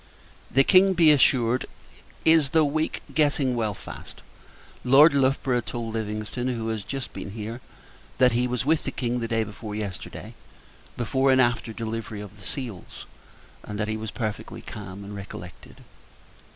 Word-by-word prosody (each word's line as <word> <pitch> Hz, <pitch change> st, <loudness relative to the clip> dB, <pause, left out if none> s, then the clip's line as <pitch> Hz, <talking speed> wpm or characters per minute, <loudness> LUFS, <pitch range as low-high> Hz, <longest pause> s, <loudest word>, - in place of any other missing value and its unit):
The 135 Hz, +3 st, +4 dB
King, 190 Hz, +4 st, +6 dB
be 165 Hz, -3 st, +7 dB
assured, 125 Hz, -4 st, +3 dB, 0.6 s
is 160 Hz, -3 st, +5 dB
(though 155 Hz, -, +6 dB
weak) 155 Hz, +2 st, -1 dB
getting 145 Hz, -4 st, +2 dB
well 110 Hz, -3 st, -1 dB
fast. -, -, -11 dB, 0.6 s
Lord 140 Hz, +5 st, +7 dB
Loughborough 130 Hz, -2 st, +2 dB
told 115 Hz, -2 st, -5 dB
Livingston, 110 Hz, +2 st, -3 dB
who 115 Hz, -3 st, -2 dB
has 110 Hz, -2 st, -3 dB
just 135 Hz, +2 st, -5 dB
been -, -, -6 dB
here, 115 Hz, +3 st, -6 dB, 0.6 s
that 125 Hz, -1 st, +5 dB
he 120 Hz, +2 st, +1 dB
was 125 Hz, 0 st, -2 dB
with 160 Hz, +1 st, +2 dB
the -, -, -2 dB
King 125 Hz, -1 st, -2 dB
the 115 Hz, -, -2 dB
day 115 Hz, -1 st, +1 dB
before 105 Hz, 0 st, -7 dB
yesterday, 100 Hz, -4 st, -6 dB, 0.6 s
before 130 Hz, +3 st, +2 dB
and 130 Hz, -, +4 dB
after 120 Hz, -2 st, +2 dB
delivery 110 Hz, -1 st, -5 dB
of 105 Hz, 0 st, -10 dB
the 95 Hz, -, -9 dB
seals, 120 Hz, -10 st, -6 dB, 0.6 s
and 105 Hz, 0 st, -6 dB
that 105 Hz, -, 0 dB
he 110 Hz, -, -1 dB
was 110 Hz, 0 st, -5 dB
perfectly 110 Hz, -2 st, -5 dB
calm 100 Hz, -1 st, -8 dB
and 100 Hz, +1 st, -8 dB
recollected. 95 Hz, -3 st, -10 dB
120 Hz, 160 wpm, -25 LUFS, 110-135 Hz, 0.6 s, be